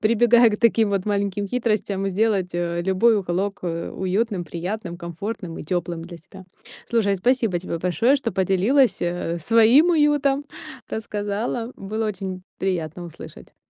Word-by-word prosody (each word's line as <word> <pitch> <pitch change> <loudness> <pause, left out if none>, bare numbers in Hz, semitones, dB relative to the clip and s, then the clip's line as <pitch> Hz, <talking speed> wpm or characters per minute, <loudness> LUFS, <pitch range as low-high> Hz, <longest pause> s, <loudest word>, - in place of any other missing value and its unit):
прибегая 235 +2 +5
к 210 - -3
таким 225 -2 +3
вот 195 -1 -1
маленьким 200 -1 -1
хитростям, 210 -4 -1
сделать, 195 -2 +1
э, 170 0 -1
любой 190 +5 +3
уголок, 195 +2 -2
э, 170 -1 -3
уютным, 190 0 -1
приятным, 175 +2 -5
комфортным 170 +1 -6
и - - -6
тёплым 170 0 -3
для 170 0 -10
себя. 190 +3 -14 0.4
Слушай, 205 -4 +2
спасибо 225 -2 +1
тебе 170 -1 -5
большое, 180 - +2
что 255 -4 -3
поделилась, 195 +8 +2
э, 175 -1 -2
своим 230 - +5
уютом, 290 -3 +2 0.5
рассказала, 220 +3 -3
было 215 +3 -3
очень 190 -3 -5 0.2
приятно 175 -3 -2
услышать! 170 - -12
200 Hz, 140 wpm, -23 LUFS, 175-225 Hz, 0.5 s, прибегая